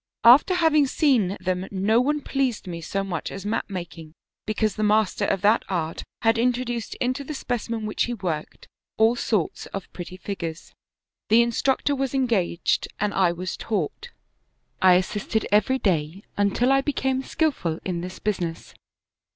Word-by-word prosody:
After 270 +10 +7
having 310 -5 +4
seen 245 - +2
them 185 0 -2
no 205 +4 +2
one 295 +3 0
pleased 270 -6 -1
me 170 -2 -6
so 195 +4 -2
much 175 -5 -4
as 195 0 -7
mat 210 - -1
making, 170 -4 -7 0.3
because 215 -1 0
the 215 - -4
master 215 -1 +2
of 190 - 0
that 215 +3 +4
art 165 -4 -2 0.2
had 225 0 +3
introduced 240 -2 -1
into 255 +3 -1
the 300 +2 -6
specimen 230 -3 -3
which 210 - 0
he 240 - -3
worked 170 -7 -5 0.3
all 225 +2 +4
sorts 215 -7 -1
of 195 -2 -7
pretty 180 +1 -8
figures. 170 -4 -5
^' - - -31 0.6
The 230 +2 +6
instructor 265 +4 +1
was 270 -1 -2
engaged 225 -10 +1
and 210 0 0
I 185 -3 +3
was 175 +1 -4
taught. 215 - -3 0.7
I 185 -1 +7
as 180 +1 +3
sisted 210 +2 -2
every 210 +6 +3
day, 175 - -1
until 205 +6 +2
I 270 0 +4
became 265 -2 -1
skillful 265 - -1
in 175 -2 -2
this 180 +1 -7
business. 175 -6 -3
210 Hz, 165 wpm, -24 LUFS, 185-250 Hz, 0.7 s, After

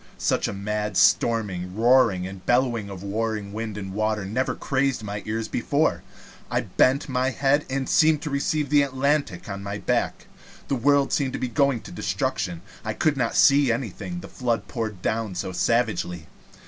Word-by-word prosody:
Such - - +1
a - - -3
mad 105 0 -3
storming, 95 -6 +2
roaring, 115 -5 +4
and 95 0 -8
bellowing 120 -4 +1
of 95 -1 -8
warring 105 0 -2
wind 110 -1 -4
and 95 -2 -6
water 110 -1 -1
never 120 +7 -1
crazed 135 -3 0
my 105 0 -4
ears 110 +1 -2
before. - - 0 0.5
I - - +1
bent 135 +3 +2
my 130 -1 0
head, 140 +2 +1
and 135 -1 -2
seemed 155 -2 +4
to 150 - -4
receive 145 +1 -1
the 145 -1 +6
Atlantic 140 -6 0
on 100 -1 -5
my 100 +1 -4
back. - - -1 0.4
The 140 - +1
world 140 +3 +2
seemed 135 -5 0 0.2
going 140 -5 +2
to - - -11
destruction. 85 -1 -2 0.2
I 110 - -2
could 155 -2 +2
not 125 -4 -1
see 140 -3 +5
anything, 130 - -4
the - - -9
flood 120 -3 -2
poured 110 -6 -4
down 110 -4 -1
savagely. 95 -2 -1
115 Hz, 165 wpm, -24 LUFS, 100-135 Hz, 0.5 s, the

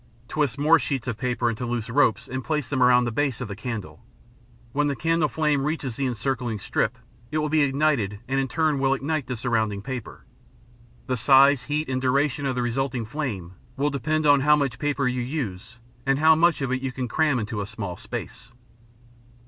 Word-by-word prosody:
Twist 145 -1 -1
more 155 +3 +5
sheets 130 -1 -3
of 115 -3 -3
paper 125 -1 0
into 115 +1 -2
loose 120 -2 -2
ropes 115 -3 +2
and 130 0 -4
place 150 -5 -2
them 130 -2 0
around 125 0 +6
the 120 - -1
base 135 0 0
of 125 - -4
the 100 - -6
candle. 105 -9 -6 0.7
When 145 +3 +1
the 140 - -1
candle 165 +3 +1
flame 150 -3 +1
reaches 145 -5 -2
the 135 +1 -1
encircling 125 -1 -2
strip, 110 +4 -1 0.3
it 155 - -2
will 150 0 0
be 155 0 +3
ignited 135 -7 +1
and 135 +1 0
in 135 - 0
turn 155 0 +1
will 135 0 +2
ignite 145 0 -2
the 125 - -3
surrounding 110 -4 -1
paper. 130 -3 -7 0.8
The 130 -2 -1
size, 135 +3 +6
heat, 150 +1 -2
and 130 -1 -2
duration 140 +2 +1
of 130 - -1
the 125 - 0
resulting 120 0 -1
flame 110 - -4 0.2
will 145 +2 +1
depend 155 +2 -1
on 145 -1 +6
how 150 +2 +5
much 140 -6 -1
paper 145 -3 0
you 125 0 -1
use 120 -5 -5 0.3
and 135 0 +2
how 160 +2 +6
much 165 -2 +3
of 130 - -2
it 130 0 -1
you 135 -1 -2
can 125 -1 -4
cramp 150 +1 +1
in 110 -3 -4
a 100 - -2
small 100 -5 -5
space. - - -7
130 Hz, 205 wpm, -25 LUFS, 120-145 Hz, 0.8 s, around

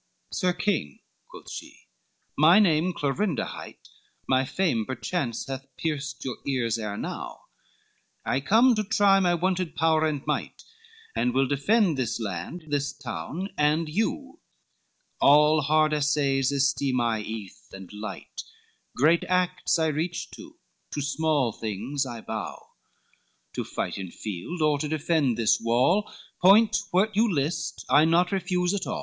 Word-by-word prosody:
XLVI - - -6
"Sir 180 -3 +1
King," 170 - -2 0.3
quoth - - -12
she, - - -9 0.5
"my 160 +5 +6
name 180 -4 +3
Clorinda 160 - -1
hight, - - -10 0.4
My 130 0 +3
fame 160 -9 0
perchance 130 +1 -3
has 135 0 -6
pierced 150 -5 -4
your 130 - -4
ears 120 -4 0
ere 105 -2 -4
now, - - -6 0.8
I - - +1
come 225 - +4
to 215 -1 0
try 200 -1 +4
my 175 -2 +2
wonted 185 -1 -1
power 160 -1 +2
and 145 -3 -3
might, - - -3 0.5
And 125 0 0
will 135 +1 +3
defend 165 - +2
this 120 -2 -1
land, 110 - -5
this 145 -1 -1
town, 145 - -5
and 150 +2 +2
you, 225 - -2 0.8
All 150 +2 +5
hard 155 +1 +2
assays 140 -2 +1
esteem 140 -2 +1
I 115 -2 0
eath 105 -3 -8
and 95 0 -11
light, 105 +1 -7 0.6
Great 160 +6 +4
acts 180 -1 +1
I 160 - +1
reach 160 +3 -2
to, - - -12 0.4
to 145 - -2
small 150 -4 +1
things 115 +7 -3
I 120 -3 -7
bow, 110 -1 -6 0.8
To - - -3
fight - - -4
in 95 -2 -6
field, 110 - -5
or 150 -2 +2
to 150 - -2
defend 150 -5 0
this 115 -2 +3
wall, 125 - +2 0.3
Point 205 +5 +6
what 200 +2 +1
you 220 +1 +3
list, 150 +1 -2
I 150 +2 +5
naught 175 +3 +3
refuse 180 -1 0
at 200 - -3
all." - - -3
150 Hz, 150 wpm, -26 LUFS, 130-180 Hz, 0.8 s, my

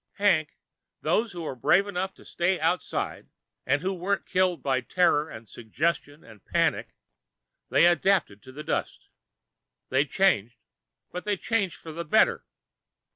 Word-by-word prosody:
Hank, 175 -7 +1 0.4
those 225 0 +1
who 175 -1 -6
were 155 - -4
brave 175 - +3
enough 190 -1 -3
to - - -17
stay 175 +2 0
outside, 165 +1 -2 0.4
and 140 +4 +1
who 190 +1 0
weren't 190 +2 -2
killed 185 -4 +1
by 130 -2 +1
terror 155 +1 +2
and 110 0 -10
suggestion 145 +7 -3
and 110 -4 -16
panic - - 0 0.7
they - - +5
adapted 175 - +2
to 130 - -13
the 150 +3 -8
dust. 160 - -3 0.8
They 135 +3 +2
changed, 130 - +1 0.5
but 180 - -5
they 210 -1 -1
changed 200 -3 -1
for 160 - -10
the 170 +2 -5
better. 195 +7 +2
170 Hz, 145 wpm, -27 LUFS, 140-190 Hz, 0.8 s, they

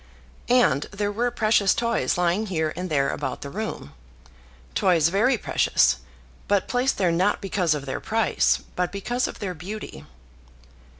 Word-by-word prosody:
And 240 - +3
there 205 0 -2
were 235 +4 0
precious 215 -4 +2
toys 235 -5 0
lying 180 +5 +1
here 160 -4 -1
and 180 +2 -4
there 140 -3 +1
about 130 -3 -4
the 140 - -7
room, 210 - -5 0.8
toys 165 - +3
very 215 +9 +2
precious, - - +2 0.5
but 200 -2 +1
placed 250 +2 0
there 185 -3 +2
not 185 +5 +1
because 185 -5 0
of 140 -2 -5
their 130 - -3
price, 225 0 +1 0.2
but 180 0 -1
because 240 +6 -1
of - - -8
their 195 -4 -4
beauty. 175 - -8
195 Hz, 155 wpm, -24 LUFS, 165-215 Hz, 0.8 s, And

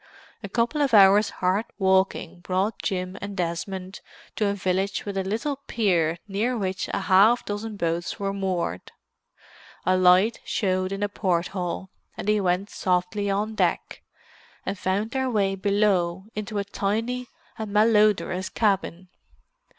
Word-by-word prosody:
A 200 - -7
couple 240 +8 0
of 270 -5 +3
hours' 200 +1 +7
hard 190 +4 0
walking 190 -2 +1
brought 190 +4 -1
Jim 185 0 -3
and 205 -1 -6
Desmond 185 +2 -4 0.3
to 210 - +1
a 200 - 0
village 190 +1 -1
with 200 -1 -4
a 195 - 0
little 230 +9 -2
pier 170 -7 +1
near 220 +5 -1
which 190 -3 -2
half 205 +6 +4
a - - -26
dozen 205 +1 -4
boats 170 -1 -2
were 195 -1 -1
moored. 185 - -3 0.9
A 185 +1 +3
light 185 +5 +4
showed 185 -2 -1
in 195 +1 -3
a - - +2
port 180 -4 -1
hole, 185 0 -4 0.3
and - - -6
they 210 -1 +3
went 185 +2 0
softly 185 +2 0
on 210 +3 -1
deck, - - -1 0.6
and 195 - -2
found 200 +3 -1
their 265 0 -1
way 200 -4 +1
below 195 -2 +1
into 210 0 -4
a 200 - 0
tiny 225 +5 -2 0.3
and 215 -2 -4
malodorous 210 -3 +3
cabin. 190 -4 0
195 Hz, 150 wpm, -25 LUFS, 185-210 Hz, 0.9 s, hours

